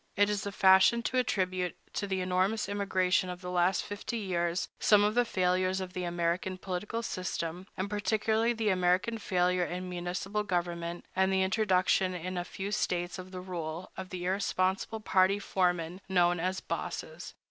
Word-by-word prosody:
It 205 Hz, +1 st, +3 dB
is 205 Hz, -1 st, -1 dB
the 200 Hz, -, -4 dB
fashion 190 Hz, +4 st, +5 dB
to 255 Hz, -, +1 dB
attribute 185 Hz, -6 st, 0 dB, 0.2 s
to 205 Hz, -, -2 dB
the 190 Hz, -1 st, -1 dB
enormous 185 Hz, +4 st, +1 dB
immigration 190 Hz, -2 st, +1 dB
of 180 Hz, 0 st, -6 dB
the 180 Hz, 0 st, -5 dB
last 180 Hz, +1 st, +2 dB
fifty 205 Hz, +3 st, -4 dB
years 175 Hz, -4 st, -1 dB
some 210 Hz, -1 st, +5 dB
of 210 Hz, +1 st, +2 dB
the 245 Hz, +1 st, +3 dB
failures 185 Hz, -1 st, +1 dB
of 185 Hz, -1 st, -5 dB
the 180 Hz, -1 st, -3 dB
American 175 Hz, +2 st, -1 dB
political 195 Hz, +5 st, -4 dB
system, 180 Hz, -2 st, -4 dB
and 185 Hz, -, -1 dB
particularly 220 Hz, +2 st, +1 dB
the 225 Hz, -2 st, 0 dB
American 185 Hz, +4 st, +2 dB
failure 180 Hz, -2 st, +1 dB
in 180 Hz, +1 st, -4 dB
municipal 180 Hz, +3 st, -3 dB
government, 175 Hz, -3 st, -2 dB
and 190 Hz, +1 st, +3 dB
the 190 Hz, 0 st, +3 dB
introduction 190 Hz, -2 st, +2 dB
in 180 Hz, +2 st, -4 dB
a 175 Hz, -, -1 dB
few 195 Hz, +3 st, -5 dB
States 180 Hz, -3 st, -1 dB
of 185 Hz, 0 st, -8 dB
the 185 Hz, -1 st, -7 dB
rule 170 Hz, -2 st, -5 dB
of 190 Hz, -1 st, -7 dB
the 180 Hz, -1 st, -5 dB
irresponsible 190 Hz, +2 st, 0 dB
party 190 Hz, -1 st, +3 dB
foremen 180 Hz, -3 st, 0 dB
known 175 Hz, -2 st, +3 dB
as 185 Hz, +2 st, -1 dB
"bosses." -, -, -5 dB
185 Hz, 170 wpm, -30 LUFS, 180-200 Hz, 0.2 s, fashion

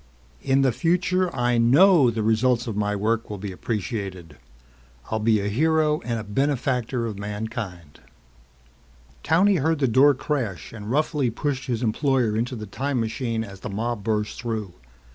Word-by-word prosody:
In 135 Hz, +1 st, +2 dB
the 130 Hz, -, +3 dB
future 180 Hz, +5 st, +1 dB
I 120 Hz, -1 st, +1 dB
know 140 Hz, +4 st, +6 dB
the 110 Hz, -1 st, -2 dB
results 115 Hz, +2 st, +2 dB
of 115 Hz, -4 st, -4 dB
my 105 Hz, 0 st, 0 dB
work 110 Hz, +3 st, -1 dB
will 105 Hz, -, -5 dB
be 100 Hz, 0 st, -6 dB
appreciated. 95 Hz, -, -5 dB, 0.7 s
I'll 110 Hz, -, 0 dB
be 110 Hz, 0 st, +3 dB
a 100 Hz, -, -2 dB
hero 155 Hz, +6 st, +2 dB
and 110 Hz, -4 st, -4 dB
benefactor 130 Hz, -2 st, 0 dB
of 105 Hz, -3 st, -5 dB
mankind." 105 Hz, -, -6 dB, 1.2 s
Towney 185 Hz, +5 st, +4 dB
heard 160 Hz, +2 st, +1 dB
the 140 Hz, -2 st, +1 dB
door 135 Hz, +4 st, +5 dB
crash 120 Hz, -, -3 dB
and 105 Hz, -2 st, -8 dB
roughly 145 Hz, -1 st, +1 dB
pushed 135 Hz, +3 st, -3 dB
his 120 Hz, -1 st, -2 dB
employer 120 Hz, -1 st, +1 dB
into 120 Hz, +3 st, -1 dB
the 110 Hz, -2 st, -6 dB
time 130 Hz, +6 st, -2 dB
machine 115 Hz, 0 st, -2 dB
as 100 Hz, -3 st, -10 dB
the -, -, -6 dB
mob 110 Hz, +1 st, -3 dB
burst 105 Hz, -1 st, -2 dB
through. 110 Hz, -6 st, -4 dB
115 Hz, 160 wpm, -24 LUFS, 105-135 Hz, 1.2 s, know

